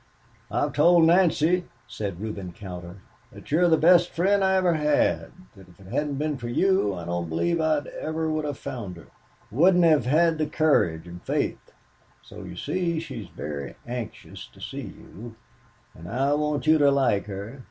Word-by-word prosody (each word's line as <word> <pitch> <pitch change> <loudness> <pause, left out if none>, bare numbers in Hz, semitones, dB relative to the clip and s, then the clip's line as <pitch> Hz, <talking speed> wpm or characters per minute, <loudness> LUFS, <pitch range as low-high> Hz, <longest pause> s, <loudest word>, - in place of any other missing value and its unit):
"I've - - -1
told 175 -1 +5
Nancy," 175 0 +3 0.2
said 100 -5 -5
Reuben 100 -4 -6
Cowder, 90 -4 -9 0.4
"that - - -14
you 155 - +3
are 180 - +5
the 160 -1 +4
best 175 +2 +5
friend 195 +3 +1
I 190 0 +3
ever 185 -2 +3
had, 150 -2 +1 0.3
that 95 -2 -16
if 85 - -21
it 95 - -15
hadn't 145 -1 -1
been 150 +1 -2
for 120 - -5
you 125 - +1
I 85 -2 -7
don't 85 -1 -3
believe 165 - 0
I 155 -2 +1 0.2
ever 160 +1 -2
would 155 -1 -1
have 145 -2 -4
found 100 -8 -6
her 85 - -13 0.5
wouldn't 175 - +4
have 155 -7 +4
had 160 +3 +3
the 155 - 0
courage 140 - +1
and 90 0 -10
faith. - - -3 0.5
So, - - -11
you 90 -1 -9
see, 170 - -2
she 135 -8 -7
is - - -17
very 70 -2 -6
anxious 120 -2 -7
to - - -21
see - - -6
you, 115 +3 -11 0.6
and 85 +2 -11
I 135 +6 +1
want 150 0 -1
you 155 0 +5
to 145 -1 +5
like 130 -8 +1
her. 100 +6 -7
145 Hz, 185 wpm, -25 LUFS, 100-165 Hz, 0.6 s, told